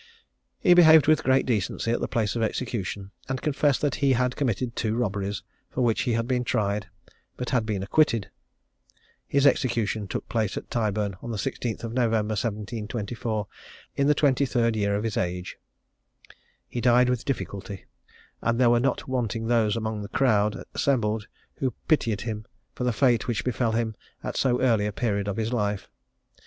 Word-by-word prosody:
He 180 Hz, -, +6 dB
behaved 160 Hz, -3 st, +8 dB
with 155 Hz, 0 st, +4 dB
great 130 Hz, 0 st, +3 dB
decency 115 Hz, 0 st, -1 dB
at 120 Hz, -, +1 dB
the -, -, -2 dB
place 110 Hz, -3 st, -1 dB
of 115 Hz, -, -1 dB
execution, 105 Hz, -4 st, -3 dB, 0.2 s
and 130 Hz, 0 st, -1 dB
confessed 145 Hz, -1 st, +1 dB
that 145 Hz, -2 st, +1 dB
he 140 Hz, -1 st, +4 dB
had 125 Hz, 0 st, +1 dB
committed 120 Hz, -2 st, -1 dB
two 110 Hz, -1 st, -1 dB
robberies, 100 Hz, -4 st, -2 dB, 0.3 s
for 130 Hz, -, -3 dB
which 115 Hz, -3 st, +2 dB
he -, -, +2 dB
had 115 Hz, +1 st, 0 dB
been 125 Hz, -1 st, +1 dB
tried, 105 Hz, -5 st, -1 dB, 0.5 s
but 125 Hz, -, -4 dB
had 115 Hz, -4 st, +1 dB
been 100 Hz, -3 st, -1 dB
acquitted. 115 Hz, -3 st, +2 dB, 1.0 s
His 140 Hz, 0 st, +2 dB
execution 115 Hz, -6 st, +1 dB
took -, -, -4 dB
place 110 Hz, -4 st, -1 dB
at -, -, -7 dB
Tyburn, 105 Hz, -4 st, -1 dB
on 120 Hz, -, -7 dB
the 115 Hz, -, -3 dB
16th 115 Hz, +3 st, -3 dB
of 115 Hz, -1 st, -4 dB
November, 115 Hz, -3 st, +1 dB
1724, 110 Hz, 0 st, -3 dB, 0.5 s
in 140 Hz, -, +2 dB
the 150 Hz, -, +4 dB
twenty 140 Hz, -1 st, +3 dB
third 115 Hz, -2 st, +1 dB
year 100 Hz, -1 st, +1 dB
of 105 Hz, -, -1 dB
his 115 Hz, -2 st, -2 dB
age. 90 Hz, 0 st, -3 dB, 1.1 s
He 120 Hz, -, -4 dB
died 125 Hz, +1 st, +5 dB
with 125 Hz, -2 st, 0 dB
difficulty; 100 Hz, -7 st, -4 dB, 0.6 s
and 115 Hz, +1 st, 0 dB
there 120 Hz, -2 st, +5 dB
were 120 Hz, -, +4 dB
not 130 Hz, +1 st, -1 dB
wanting 120 Hz, -3 st, -2 dB
those 115 Hz, -2 st, +2 dB
among 110 Hz, -1 st, -3 dB
the 100 Hz, -, -7 dB
crowd 105 Hz, -6 st, +2 dB
assembled, 110 Hz, -6 st, 0 dB, 0.3 s
who 130 Hz, -2 st, -1 dB
pitied 115 Hz, -9 st, +2 dB
him 110 Hz, -2 st, -5 dB, 0.3 s
for 125 Hz, -, -3 dB
the 125 Hz, -, +2 dB
fate 120 Hz, -1 st, +2 dB
which 120 Hz, -3 st, -1 dB
befel 120 Hz, -2 st, 0 dB
him 110 Hz, -1 st, -1 dB, 0.3 s
at -, -, -4 dB
so 125 Hz, -2 st, +2 dB
early 115 Hz, -5 st, +3 dB
a -, -, -2 dB
period 100 Hz, -2 st, -1 dB
of 100 Hz, +1 st, -2 dB
his 115 Hz, +2 st, -1 dB
life. 105 Hz, -4 st, -2 dB
115 Hz, 180 wpm, -26 LUFS, 105-125 Hz, 1.1 s, behaved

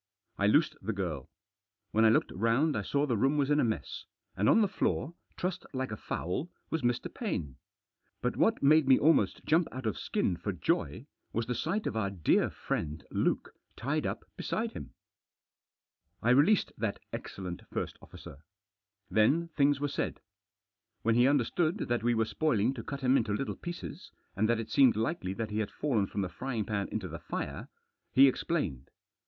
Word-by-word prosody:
I 100 Hz, -, +3 dB
loosed 155 Hz, +7 st, +4 dB
the 115 Hz, -, -2 dB
girl. 85 Hz, -9 st, -4 dB, 0.6 s
When 110 Hz, +1 st, +4 dB
I -, -, +7 dB
looked 110 Hz, -, +2 dB
round 115 Hz, -, +2 dB
I 105 Hz, -, 0 dB
saw 140 Hz, +8 st, 0 dB
the 125 Hz, -5 st, 0 dB
room 135 Hz, +7 st, +2 dB
was 145 Hz, 0 st, +1 dB
in 145 Hz, -, +4 dB
a -, -, +4 dB
mess, 110 Hz, -2 st, -3 dB, 0.3 s
and 105 Hz, -, +2 dB
on 225 Hz, -, +6 dB
the 210 Hz, -, +4 dB
floor, 170 Hz, -4 st, -1 dB, 0.2 s
trussed 180 Hz, 0 st, -2 dB
like 130 Hz, -2 st, -2 dB
a -, -, -2 dB
fowl, 100 Hz, -, -3 dB, 0.2 s
was 160 Hz, -, 0 dB
Mr. 120 Hz, -1 st, 0 dB
Paine. 85 Hz, -, -3 dB, 0.6 s
But -, -, -1 dB
what -, -, +2 dB
made 155 Hz, 0 st, +5 dB
me 130 Hz, -, +7 dB
almost 160 Hz, +3 st, +3 dB
jump 160 Hz, +2 st, +3 dB
out 130 Hz, -1 st, -6 dB
of 110 Hz, -, -1 dB
skin -, -, 0 dB
for -, -, -3 dB
joy, -, -, -1 dB, 0.3 s
was 115 Hz, 0 st, 0 dB
the 125 Hz, -, -2 dB
sight 175 Hz, -, -1 dB
of -, -, -2 dB
our 105 Hz, -3 st, 0 dB
dear 90 Hz, -6 st, +2 dB
friend 75 Hz, -1 st, -4 dB
Luke -, -, 0 dB, 0.2 s
tied -, -, -1 dB
up -, -, -4 dB
beside -, -, -2 dB
him. -, -, -9 dB, 1.3 s
I 120 Hz, -, +4 dB
released 150 Hz, +11 st, +4 dB
that 110 Hz, -3 st, -1 dB, 0.2 s
excellent 90 Hz, -2 st, -6 dB
first -, -, -4 dB
officer. 70 Hz, -, -12 dB, 0.7 s
Then 150 Hz, +11 st, +3 dB
things 145 Hz, -2 st, +2 dB
were 145 Hz, -, 0 dB
said. -, -, -3 dB, 0.8 s
When 115 Hz, -, +3 dB
he 120 Hz, +2 st, +5 dB
understood 155 Hz, +3 st, +2 dB
that 120 Hz, -1 st, -1 dB
we 120 Hz, +1 st, +2 dB
were 115 Hz, 0 st, +2 dB
spoiling 125 Hz, -2 st, +1 dB
to 125 Hz, -, -6 dB
cut 140 Hz, +3 st, -5 dB
him 130 Hz, 0 st, +3 dB
up -, -, +6 dB
into 110 Hz, -3 st, 0 dB
little 135 Hz, +7 st, -2 dB
pieces, 135 Hz, -, -7 dB, 0.3 s
and 110 Hz, +3 st, +1 dB
that 120 Hz, -1 st, +2 dB
it 115 Hz, -, -6 dB
seemed 135 Hz, -3 st, +5 dB
likely 110 Hz, -, -1 dB
that 110 Hz, -1 st, -4 dB
he 105 Hz, -, -1 dB
had 105 Hz, -, -1 dB
fallen 115 Hz, -10 st, 0 dB
from 100 Hz, -, -3 dB
the 95 Hz, -, -1 dB
frying 115 Hz, +4 st, -3 dB
pan 100 Hz, -1 st, -2 dB
into 105 Hz, -4 st, -4 dB
the 85 Hz, -1 st, -7 dB
fire, -, -, -5 dB, 0.4 s
he 135 Hz, +1 st, +7 dB
explained. 115 Hz, -, -1 dB
120 Hz, 190 wpm, -31 LUFS, 105-145 Hz, 1.3 s, I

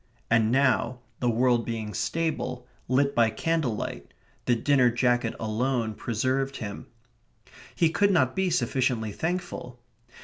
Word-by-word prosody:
And 115 Hz, -1 st, +4 dB
now, 130 Hz, -2 st, +2 dB, 0.2 s
the 125 Hz, -, +1 dB
world 120 Hz, 0 st, +2 dB
being 110 Hz, -2 st, -4 dB
stable, 150 Hz, -6 st, -2 dB, 0.2 s
lit 140 Hz, +2 st, +2 dB
by 115 Hz, -1 st, +4 dB
candle 145 Hz, +1 st, 0 dB
light, -, -, -6 dB, 0.3 s
the 120 Hz, -, +3 dB
dinner 130 Hz, 0 st, +3 dB
jacket 120 Hz, -1 st, +1 dB
alone 115 Hz, +1 st, -1 dB
preserved 130 Hz, +5 st, -1 dB
him. 100 Hz, -3 st, -6 dB, 0.9 s
He 165 Hz, -2 st, +3 dB
could 200 Hz, +4 st, +3 dB
not 130 Hz, -10 st, +2 dB
be 190 Hz, -1 st, +1 dB
sufficiently 125 Hz, -9 st, 0 dB
thankful. 160 Hz, -, -4 dB
125 Hz, 130 wpm, -27 LUFS, 115-140 Hz, 0.9 s, And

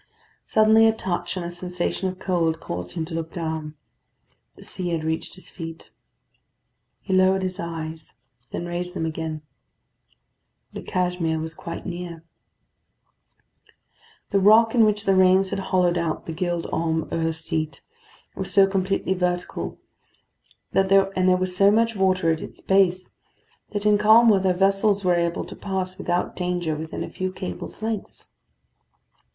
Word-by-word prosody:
Suddenly 220 Hz, +1 st, +5 dB
a 225 Hz, -, +4 dB
touch 180 Hz, -3 st, -3 dB
and 175 Hz, -, -3 dB
a 170 Hz, -, -4 dB
sensation 180 Hz, +1 st, -2 dB
of 185 Hz, -, -7 dB
cold 165 Hz, -4 st, 0 dB
caused 90 Hz, -, -5 dB
him 160 Hz, -, -2 dB
to 165 Hz, -, -9 dB
look 165 Hz, 0 st, -4 dB
down. 160 Hz, -3 st, -4 dB, 0.8 s
The -, -, -14 dB
sea 180 Hz, -1 st, -2 dB
had 165 Hz, -2 st, -1 dB
reached 160 Hz, +3 st, -2 dB
his 185 Hz, -, -10 dB
feet. 165 Hz, -2 st, -9 dB, 1.1 s
He 190 Hz, -, -3 dB
lowered 190 Hz, 0 st, +4 dB
his 185 Hz, +1 st, -3 dB
eyes, 160 Hz, -, -6 dB, 0.3 s
then 175 Hz, -, -4 dB
raised 175 Hz, +1 st, -4 dB
them 160 Hz, -, -1 dB
again. 160 Hz, -1 st, -4 dB, 1.3 s
The -, -, -6 dB
Cashmere 180 Hz, -3 st, -1 dB
was 160 Hz, +1 st, -5 dB
quite 170 Hz, +1 st, -7 dB
near. 175 Hz, -2 st, -6 dB, 2.1 s
The 200 Hz, -, +3 dB
rock 220 Hz, +3 st, +6 dB
in 230 Hz, -3 st, +5 dB
which 210 Hz, 0 st, 0 dB
the 195 Hz, -, +4 dB
rains 190 Hz, 0 st, +4 dB
had -, -, -1 dB
hollowed 180 Hz, -2 st, +1 dB
out 165 Hz, -2 st, -2 dB
the 165 Hz, -, -5 dB
Gild 175 Hz, 0 st, -2 dB
Holm 160 Hz, -1 st, -1 dB
'Ur 165 Hz, 0 st, 0 dB
seat 160 Hz, -2 st, -3 dB, 0.5 s
was -, -, -3 dB
so 195 Hz, -1 st, +7 dB
completely 195 Hz, 0 st, 0 dB
vertical, 180 Hz, -1 st, -2 dB, 1.0 s
and 195 Hz, 0 st, +2 dB
there 195 Hz, -1 st, +4 dB
was 185 Hz, 0 st, -1 dB
so 195 Hz, +2 st, +6 dB
much 230 Hz, +2 st, +2 dB
water 185 Hz, -3 st, +2 dB
at 160 Hz, -, -2 dB
its -, -, -8 dB
base, 185 Hz, -1 st, +1 dB, 0.5 s
that 205 Hz, -1 st, -4 dB
in 210 Hz, -1 st, +4 dB
calm 220 Hz, +3 st, +7 dB
weather 190 Hz, -3 st, +3 dB
vessels 195 Hz, +1 st, +2 dB
were 180 Hz, -, +4 dB
able 170 Hz, +1 st, 0 dB
to -, -, -9 dB
pass 190 Hz, -1 st, -4 dB
without 175 Hz, -1 st, -1 dB
danger 175 Hz, -3 st, -1 dB
within 160 Hz, +1 st, -5 dB
a -, -, -6 dB
few 185 Hz, 0 st, -3 dB
cables' 90 Hz, -, -7 dB
lengths. 220 Hz, -2 st, -4 dB
180 Hz, 155 wpm, -24 LUFS, 165-195 Hz, 2.1 s, so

